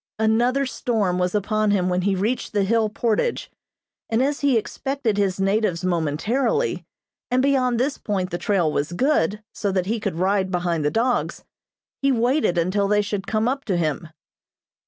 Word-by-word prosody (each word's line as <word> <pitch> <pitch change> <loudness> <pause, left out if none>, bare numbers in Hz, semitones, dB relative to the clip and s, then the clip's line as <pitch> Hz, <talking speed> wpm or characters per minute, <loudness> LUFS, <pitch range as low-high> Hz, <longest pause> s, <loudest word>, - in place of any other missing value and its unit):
Another 240 +5 +2
storm 220 -8 -1
was 180 +2 0
upon 215 +1 +1
him 190 -3 +2
when 180 0 0
he 195 +1 +1
reached 220 +7 -2
the 205 -1 +2
hill 220 +2 +2
portage, 230 - -1 0.6
and 225 +3 +2
as 285 +1 0
he 280 -4 +3
expected 260 0 -2
his 195 -2 0
natives 195 -3 +1
momentarily, 185 - 0 0.5
and 255 +1 +2
beyond 255 -4 +2
this 275 +3 -1
point 190 -3 -2
the 175 - -3
trail 180 -7 +1
was 150 +3 -2
good, 210 - +1
so 200 - -2
that 185 -1 0
he 225 +4 -1
could 200 -5 -3
ride 190 +2 +1
behind 175 -3 -1
the 145 - +2
dogs, 240 +6 -1 0.6
he 275 0 +3
waited 245 - +1
until 185 +4 +1
they 210 0 +2
should 200 0 -4
come 220 +1 0
up 270 +2 -1
to 190 -4 0
him. 155 -1 -1
210 Hz, 175 wpm, -23 LUFS, 185-245 Hz, 0.6 s, he